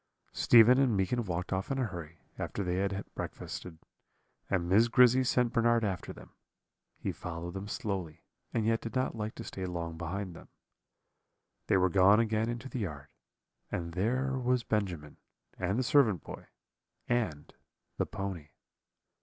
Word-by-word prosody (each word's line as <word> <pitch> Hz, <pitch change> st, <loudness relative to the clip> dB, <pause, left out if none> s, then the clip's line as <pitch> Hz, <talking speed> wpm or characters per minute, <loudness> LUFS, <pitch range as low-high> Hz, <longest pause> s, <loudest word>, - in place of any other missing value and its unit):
"Stephen 120 Hz, +2 st, +7 dB
and 125 Hz, -6 st, +3 dB
Meekin 115 Hz, +6 st, +1 dB
walked 90 Hz, 0 st, -3 dB
off 95 Hz, +1 st, -2 dB
in 135 Hz, -, -1 dB
a 130 Hz, -, +1 dB
hurry, 85 Hz, -5 st, -8 dB, 0.2 s
after 100 Hz, -, -3 dB
they 90 Hz, 0 st, -1 dB
had 100 Hz, 0 st, -1 dB
breakfasted, 85 Hz, -3 st, -6 dB, 0.7 s
and 90 Hz, -3 st, 0 dB
Miss 105 Hz, +6 st, +5 dB
Grizzy 125 Hz, +2 st, +5 dB
sent 125 Hz, -1 st, +1 dB
Bernard 120 Hz, -1 st, +3 dB
after 95 Hz, -5 st, -2 dB
them. -, -, -13 dB, 0.7 s
He -, -, -3 dB
followed 85 Hz, 0 st, -6 dB
them 95 Hz, +1 st, -5 dB
slowly, 95 Hz, -7 st, -4 dB, 0.3 s
and 110 Hz, -2 st, 0 dB
yet 115 Hz, 0 st, +2 dB
did 115 Hz, -, -6 dB
not 130 Hz, 0 st, 0 dB
like 110 Hz, 0 st, -4 dB
to 115 Hz, -, -7 dB
stay 95 Hz, -, -6 dB
long 85 Hz, -2 st, -4 dB
behind 90 Hz, +2 st, -4 dB
them. -, -, -12 dB, 1.2 s
"They -, -, +4 dB
were 95 Hz, 0 st, +4 dB
gone 95 Hz, +4 st, +6 dB
again 110 Hz, 0 st, +1 dB
into 120 Hz, +2 st, -4 dB
the 130 Hz, -, -5 dB
yard, 75 Hz, -9 st, -5 dB, 0.6 s
and 85 Hz, -1 st, -3 dB
there 130 Hz, +8 st, 0 dB
was 125 Hz, -1 st, +1 dB
Benjamin, 90 Hz, -10 st, -2 dB, 0.4 s
and 95 Hz, +3 st, 0 dB
the 130 Hz, -, +1 dB
servant 120 Hz, -, +3 dB
boy, -, -, -9 dB, 0.6 s
and 110 Hz, -12 st, -1 dB, 0.4 s
the -, -, 0 dB
pony. 95 Hz, -6 st, -5 dB
100 Hz, 160 wpm, -31 LUFS, 90-120 Hz, 1.2 s, Stephen